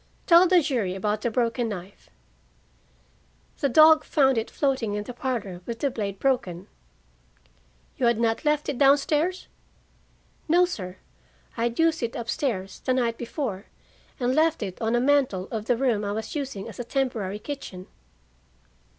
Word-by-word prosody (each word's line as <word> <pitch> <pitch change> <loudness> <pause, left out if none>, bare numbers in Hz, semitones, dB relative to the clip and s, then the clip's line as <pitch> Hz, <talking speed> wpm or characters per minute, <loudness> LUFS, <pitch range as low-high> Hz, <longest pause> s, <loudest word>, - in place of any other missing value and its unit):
"Tell 345 +1 +7
the 355 -2 +4
jury 235 -11 -1
about 210 +2 -1
the 235 - 0
broken 235 0 0
knife." 190 -1 -9 1.5
"The 280 - +1
dog 310 +3 +7
found 270 -4 +3
it 225 0 -2
floating 260 -7 -1
in 210 - -3
the 245 - -8
parlor, 230 -8 -4
with 235 -1 -4
the 280 +3 -1
blade 200 -4 -4
broken." 195 -9 -1 1.3
"You 255 -5 +2
had 235 -1 +2
not 230 +1 0
left 300 -1 +1
it 280 -4 -3
down 280 0 +6
stairs?" 320 +6 -1 1.0
"No, 350 +3 +5
sir. 185 - -6 0.6
I 230 - 0
had 235 0 -2
used 325 0 +2
it 235 -1 -3
up 235 -1 -3
stairs, 210 -11 -3
the 255 - 0
night 235 -2 0
before, 235 -5 -4 0.5
and 250 0 +1
left 315 -3 +2
it 190 +1 -6
on 225 +1 +1
a - - +3
mantel 255 -8 +2
of 215 -2 -4
the 245 0 +1
room 235 -5 +1
I 205 0 -2
was 220 +1 -5
using 270 -10 -4
as - - -10
a - - -2
temporary 230 -6 -2
kitchen." 210 -8 -7
240 Hz, 170 wpm, -25 LUFS, 210-280 Hz, 1.5 s, Tell